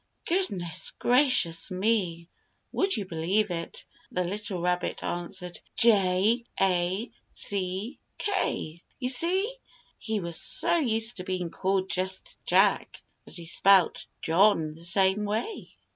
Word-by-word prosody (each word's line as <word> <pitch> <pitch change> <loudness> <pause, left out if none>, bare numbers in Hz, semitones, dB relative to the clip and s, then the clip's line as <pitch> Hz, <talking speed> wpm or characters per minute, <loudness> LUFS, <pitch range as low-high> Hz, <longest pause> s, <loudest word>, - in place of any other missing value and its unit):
Goodness 195 - -1
gracious 245 - +3
me! 185 -4 0 0.4
Would 385 0 +1
you 205 - -3
believe 185 +4 0
it, 165 -1 -5 0.3
the 180 - 0
little 200 +1 -4
rabbit 180 0 -1
answered 175 0 -5 0.2
"J 210 +1 +4 0.2
A 185 +4 +1 0.2
C 195 +5 -3 0.2
K!" 360 - -2 0.2
You 250 -1 -2
see, 370 - +2 0.4
he 220 -1 -2
was 170 -3 -3
so - - +3
used 225 -4 +1
to 185 - -3
being 180 -2 -3
called 190 0 0
just 185 +1 -3
"Jack" - - +2 0.2
that - - -13
he 170 - -7
spelt 190 +1 +4 0.2
"John" 165 -2 +3
the 165 +2 -12
same 190 +3 +2
way. 220 - -3
190 Hz, 125 wpm, -27 LUFS, 175-225 Hz, 0.4 s, J